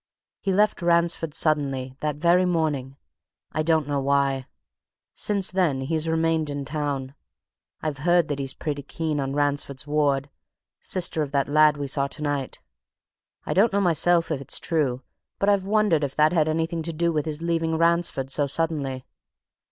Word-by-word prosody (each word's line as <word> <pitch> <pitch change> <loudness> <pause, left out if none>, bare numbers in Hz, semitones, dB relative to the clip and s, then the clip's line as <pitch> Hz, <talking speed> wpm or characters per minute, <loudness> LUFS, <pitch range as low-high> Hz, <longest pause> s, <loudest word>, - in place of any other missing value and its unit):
He 195 - -1
left 205 +1 +2
Ransford 170 -2 +1
suddenly 135 -4 0
that 150 -1 -2
very 170 +4 +3
morning. 150 -7 -1 0.5
I 155 - -1
don't 160 -2 +1
know 145 -1 0
why. 135 -1 +1 0.7
Since 200 -3 -1
then 175 -8 +1
he's 160 +3 -2
remained 160 -1 +1
in 145 -1 -3
the - - -10
town. 140 -2 -3 0.7
I've 150 -3 -3
heard 175 +1 +3
that 145 -1 -3
he's 135 0 -4
pretty 145 -3 -4
keen 155 +1 -3
on 135 0 -2
Ransford's 145 -2 -1
ward 145 -2 0 0.5
sister 170 -3 +1
of 145 - -2
that 140 -1 +1
lad 150 0 +4
we 145 - -3
saw 140 0 +1
tonight. 145 -2 -3 0.9
I - - -1
don't 210 +5 +4
know 200 - +1
myself, 175 -2 +3
if 140 -3 -2
it's 135 - -1
true 135 -7 -1 0.3
but 200 - +1
I've 200 -2 +2
wondered 205 -7 +2
if 140 -2 -3
that 155 +2 +4
had 160 -3 +2
anything 165 +1 -1
to 165 +1 -3
do 170 +2 +1
with 150 -2 -1
his 155 +1 -3
leaving 165 -1 0
Ransford 170 -5 +1
so 145 +1 0
suddenly." 140 -4 -2
155 Hz, 170 wpm, -24 LUFS, 140-170 Hz, 0.9 s, lad